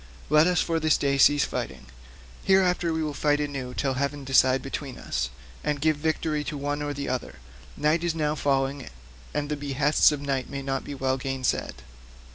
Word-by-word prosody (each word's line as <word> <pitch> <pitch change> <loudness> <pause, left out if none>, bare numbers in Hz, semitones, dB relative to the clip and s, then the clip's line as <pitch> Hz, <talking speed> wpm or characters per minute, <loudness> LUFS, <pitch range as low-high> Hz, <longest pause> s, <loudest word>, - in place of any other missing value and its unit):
Let 155 +2 +6
us 180 -1 +2
for 165 -1 0
this 155 -1 +3
day 140 -1 0
cease 145 +1 +5
fighting; 65 0 -5 0.6
hereafter 180 -3 +3
we 160 0 -1
will 150 -1 -2
fight 145 0 +1
anew 135 -4 -4
till 135 -2 0
heaven 140 +2 -2
decide 130 0 +3
between 135 -1 -5
us, - - -2 0.3
and 150 -1 -1
give 155 +1 +2
victory 155 0 -1
to 150 - -4
one 145 +1 -2
or 145 - -2
to 145 - -4
the 140 0 -4
other; 125 - -3 0.4
night 155 +3 +2
is 170 -1 0
now 150 -2 0
falling, 135 -2 -1 0.4
and 145 0 -2
the 150 - -2
behests 145 +1 +3
of 150 - -2
night 135 -2 -2
may 140 -1 -5
not 135 -1 -2
be 145 - -6
well 130 0 0
gainsaid. 135 -1 -2
145 Hz, 195 wpm, -26 LUFS, 135-150 Hz, 0.6 s, Let